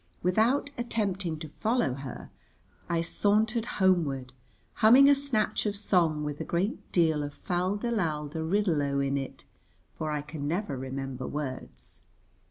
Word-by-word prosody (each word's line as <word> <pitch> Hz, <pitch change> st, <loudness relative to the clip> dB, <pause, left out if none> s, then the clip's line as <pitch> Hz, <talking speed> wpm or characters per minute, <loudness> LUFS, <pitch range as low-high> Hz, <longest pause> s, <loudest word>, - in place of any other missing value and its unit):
Without 225 Hz, +10 st, +2 dB
attempting 195 Hz, -8 st, -1 dB
to 155 Hz, -, -7 dB
follow 215 Hz, -, 0 dB
her, 135 Hz, -2 st, -8 dB, 0.6 s
I 170 Hz, -1 st, +1 dB
sauntered 215 Hz, +6 st, +1 dB
homeward 150 Hz, -10 st, +1 dB, 0.4 s
humming 250 Hz, +6 st, +7 dB
a 285 Hz, -, +8 dB
snatch 240 Hz, -7 st, +1 dB
of 205 Hz, -, -1 dB
song 170 Hz, -7 st, +1 dB
with 150 Hz, -1 st, -4 dB
a -, -, -1 dB
great 185 Hz, +6 st, -2 dB
deal 160 Hz, -4 st, +3 dB
of 145 Hz, 0 st, -5 dB
fal 180 Hz, +2 st, -1 dB
de 235 Hz, +3 st, -2 dB
lal 155 Hz, -9 st, -1 dB
de 160 Hz, +2 st, -4 dB
riddle 175 Hz, -2 st, +1 dB
o 140 Hz, -1 st, 0 dB
in 140 Hz, 0 st, 0 dB
it, 135 Hz, -1 st, -5 dB, 0.6 s
for 155 Hz, -, -2 dB
I 150 Hz, -1 st, -2 dB
can 150 Hz, -1 st, -5 dB
never 170 Hz, -2 st, -1 dB
remember 130 Hz, 0 st, -5 dB
words. 140 Hz, -3 st, -6 dB
170 Hz, 155 wpm, -28 LUFS, 145-210 Hz, 0.6 s, a